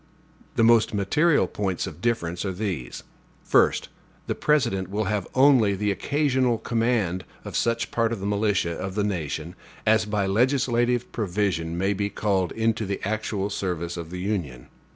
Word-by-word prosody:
The 115 - +3
most 115 0 +4
material 145 - +3
points 95 -3 -2
of 80 +3 -9
difference 90 -7 -1
are 95 - -2
these: 90 - -4 0.4
First. - - +3 0.4
The - - -1
President 115 -12 +1
will 105 +2 -1
have 105 -1 -1
only 130 -7 +5
the 105 +1 0
occasional 130 0 +1
command 115 -6 0 0.2
of - - -6
such 115 0 0
part 115 -1 +1
of 115 - -3
the 95 - -5
militia 100 -4 +1
of 95 +2 -5
the 105 - +1
nation 85 -4 -3 0.3
as 110 0 +4
by 105 -2 0
legislative 120 +2 +1
provision 90 -6 -1
may 95 +3 +1
be 100 +1 -1
called 95 -4 0
into 110 -1 0
the 100 - -2
actual 105 -2 -2
service 85 -3 -3
of 85 -2 -6
the 90 - -6
Union. 85 -11 -3
105 Hz, 160 wpm, -25 LUFS, 95-115 Hz, 0.4 s, only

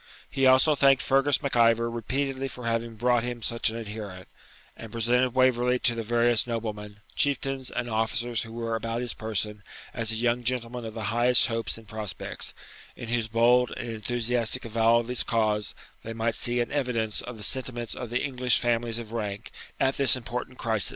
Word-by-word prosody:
He 135 -1 +3
also 130 +4 +6
thanked 135 -2 +4
Fergus 135 +2 +2
Mac 140 - -2
Ivor 115 0 +4
repeatedly 135 +4 -2
for 125 -2 -9
having 115 0 -2
brought 120 +2 +2
him 120 -1 -5
such 115 +1 +1
an 115 - -5
adherent, 105 -4 -7 0.5
and 115 - -10
presented 120 +2 +1
Waverley 125 -1 +3
to 120 -1 +3
the 115 - -3
various 120 0 +2
noblemen, 105 -3 -5
chieftains, 135 -2 0
and 120 - -3
officers 115 +1 0
who 115 - -8
were 115 0 -3
about 115 +1 -3
his 120 -2 -2
person 105 -1 -3 0.3
as 115 -2 -1
a - - 0
young 120 +1 0
gentleman 120 -1 -2
of 110 0 -7
the 110 - -5
highest 120 +1 +5
hopes 115 -2 -2
and 115 -1 -14
prospects, 105 -2 -3 0.4
in 115 - -8
whose 120 -2 0
bold 120 +2 +3
and 120 - -5
enthusiastic 120 +2 0
avowal 115 +1 +3
of 115 - -10
his 125 0 0
cause 105 -2 0 0.3
they 115 - -6
might 115 0 -1
see 120 +2 +1
an 120 - -3
evidence 125 -7 -1
of 125 -2 -8
the 105 - -8
sentiments 120 0 -2
of 125 - -6
the 125 +2 -1
English 125 -2 +2
families 115 -1 0
of 115 -2 -7
rank 105 -3 -4 0.3
at 135 0 +1
this 135 -3 +5
important 125 +1 -5
crisis. 110 -3 +1
115 Hz, 190 wpm, -27 LUFS, 115-125 Hz, 0.5 s, also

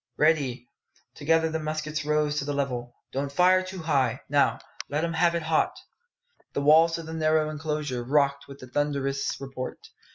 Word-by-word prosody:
"Ready!" 140 -6 +1 0.5
Together 160 +2 +1
the 160 - -1
muskets 155 0 -3
rose 150 0 +1
to 140 - -3
the 145 - -2
level. 125 -3 -3 0.2
"Don't 140 +1 -2
fire 185 +4 +5
too 185 -2 -7
high. 135 -6 +1
Now, 145 0 +3 0.3
let 150 +3 -1
'em 170 0 -1
have 170 +1 +3
it 170 - -1
hot!" 160 0 +1 0.8
The - - -1
walls 160 +3 +6
of 165 - -7
the 160 - -7
narrow 155 -1 +2
enclosure 150 -5 -3
rocked 140 +1 +1
with 140 0 -10
the 130 - -9
thunderous 140 0 -1
report. 135 -2 -6
150 Hz, 170 wpm, -26 LUFS, 140-160 Hz, 0.8 s, walls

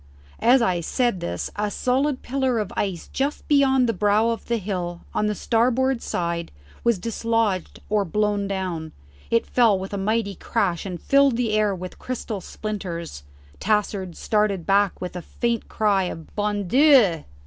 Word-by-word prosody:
As 245 +1 +5
I 180 -5 +1
said 240 +2 0
this 85 - -4
a 210 0 -1
solid 255 +6 0
pillar 260 -2 0
of 210 -3 -2
ice 190 -4 -2
just 280 +2 -2
beyond 265 -3 +4
the 230 - +1
brow 210 +3 +2
of 230 - -3
the 235 - +1
hill 180 -4 -4
on 210 - +1
the 210 - -1
starboard 250 +3 +1
side 170 -1 -2 0.3
was 235 -3 +3
dislodged 225 -2 -1
or 210 -1 +2
blown 205 +2 0
down; 180 -5 -3 0.4
it 230 - +2
fell 230 -5 +3
with 190 +2 -6
a 200 - -2
mighty 210 +1 0
crash, 195 -2 -1
and 180 -2 -5
filled 275 -3 +3
the 240 -3 0
air 210 -2 +2
with 185 0 -8
crystal 230 -5 -4
splinters. 175 - -5 0.4
Tassard 200 -4 -1
started 210 -5 0
back 200 -1 +2
with 180 0 -6
a 180 - -4
faint 235 +4 -2
cry 200 -3 +2
of 165 -2 -8
"Bon 205 -2 -1
Dieu!" 250 - +5
210 Hz, 165 wpm, -23 LUFS, 185-235 Hz, 0.4 s, As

